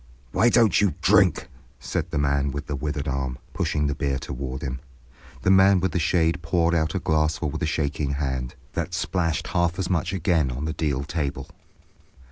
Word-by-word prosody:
"Why 120 - +4
don't 115 -3 +4
you 100 -7 +2
drink?" 95 -4 +4 0.3
said - - -3
the - - -3
man 70 -1 +1
with 70 +1 -4
the 75 - -3
withered 75 +1 -3
arm, 65 -2 -2 0.2
pushing 75 -1 0
the 70 - 0
beer 70 -2 -1
toward 65 0 -5
him. 65 -1 -3 0.6
The 95 - +4
man 95 0 +6
with 95 -1 0
the 90 - 0
shade 80 +1 +1
poured 85 +1 +1
out 80 +1 0
a - - +1
glassful 80 -2 0
with 75 - -5
a - - +1
shaking 75 -2 -1
hand, 65 -3 -3 0.2
that 90 - -3
splashed 85 -2 -1
half 85 0 +1
as 95 -1 -2
much 85 0 0
again 85 -7 +1
on 65 +4 -4
the 80 - -2
deal 70 -5 -1
table. 70 -3 -3
75 Hz, 190 wpm, -24 LUFS, 70-85 Hz, 0.6 s, man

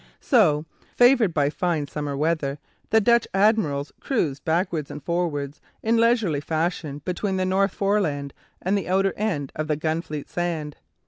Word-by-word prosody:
So, 160 - +3 0.3
favoured 245 -5 +5
by 145 -2 +1
fine 165 -3 -1
summer 145 -1 -4
weather, 150 -2 0 0.3
the 220 - +5
Dutch 235 +2 +3
admirals 195 -9 +2
cruised 155 - -1
backwards 165 -2 0
and 150 - -8
forwards 155 -4 -2 0.2
in 225 +1 +2
leisurely 225 - +2
fashion 155 -2 -2
between 190 +2 -1
the 185 - 0
North 195 +1 +1
Foreland 165 -9 0 0.3
and 190 +3 +1
the 195 -3 -2
outer 195 +1 +2
end 170 -11 -2
of 155 0 -3
the 150 -1 0
Gunfleet 155 -1 -3
Sand. 165 -4 -3
170 Hz, 150 wpm, -24 LUFS, 150-195 Hz, 0.3 s, favoured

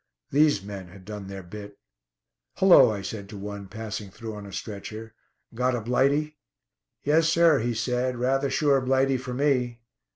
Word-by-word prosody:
These 145 -7 +3
men 100 -2 -7
had 95 +1 -15
done 105 -1 -7
their 95 -1 -7
bit. 100 +3 -10 0.8
"Hullo," 190 -9 +7
I 100 -2 -3
said 100 0 -6
to 105 - -8
one 100 0 -7
passing 105 -1 -6
through 110 +3 -8
on 105 -1 -8
a - - -10
stretcher, 110 +2 -7 0.4
"got 125 +2 +1
a 120 - -2
'blighty'?" 140 +6 +1 0.6
"Yes, 155 +2 +3
sir," 165 -3 +5
he 120 +1 -1
said; 125 +2 -1
"rather 135 +3 +1
sure 140 -2 +2
Blighty 135 +1 +2
for 125 0 -6
me." 125 -4 +1
120 Hz, 165 wpm, -26 LUFS, 105-135 Hz, 0.8 s, Hullo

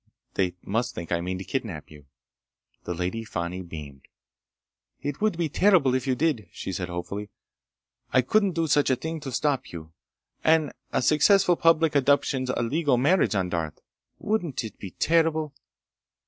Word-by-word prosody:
They 90 -2 0
must 115 +5 -1
think 85 -1 -6
I 85 -1 +1
mean 90 +1 -3
to 95 - -6
kidnap 100 - -4
you." 75 -2 -15 0.8
The 90 - -3
Lady 90 +6 -2
Fani 90 -3 -4
beamed. 75 -6 -10 0.9
"It 145 +4 -4
would 215 -5 +1
be 170 -2 0
terrible 170 -5 +4
if 130 0 -1
you 130 - +2
did," 140 -7 0
she - - -6
said 90 0 -3
hopefully. 100 +4 -5 0.8
"I 130 - +4
couldn't 200 - +2
do 165 0 0
a - - 0
thing 145 +2 +1
to 140 -2 -6
stop 140 +2 -1
you! 80 -1 -9 0.5
And 160 -3 +3 0.2
a - - 0
successful 180 - +5
public 165 -1 +3
abduction's 140 -2 +2
a 125 - 0
legal 145 +2 +1
marriage, 145 - +3
on 95 -2 0
Darth! 80 -3 -3 0.4
Wouldn't 175 - -1
it 110 - -8
be 95 - -6
terrible?" 160 - +1
130 Hz, 160 wpm, -26 LUFS, -, 0.9 s, successful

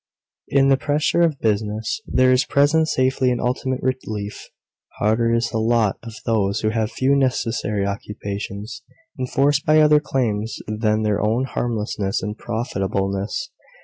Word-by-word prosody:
In 135 0 +3
the 135 - +5
pressure 150 +4 +1
of 160 -5 +2
business 110 - -1
there 130 0 +3
is 130 0 +4
present 150 +3 +3
safety 130 -2 +1
and 125 -1 0
ultimate 130 +1 -1
relief. 110 -6 -4 0.5
Harder 110 +3 +2
is 115 0 +1
the 110 - -1
lot 110 -2 +1
of 115 -2 -9
those 100 -4 +1
who 110 - +1
have 110 0 -1
few 135 +2 +2
necessary 115 -6 0
occupations, 100 +1 -5 0.4
enforced 140 +3 +1
by 155 +1 +4
other 150 -1 +6
claims 115 -6 -2
than 110 0 0
their 105 -1 +1
own 110 +4 +1
harmlessness 105 -6 -2
and 105 +2 -3
profitableness. 100 - -2
115 Hz, 145 wpm, -21 LUFS, 105-130 Hz, 0.5 s, other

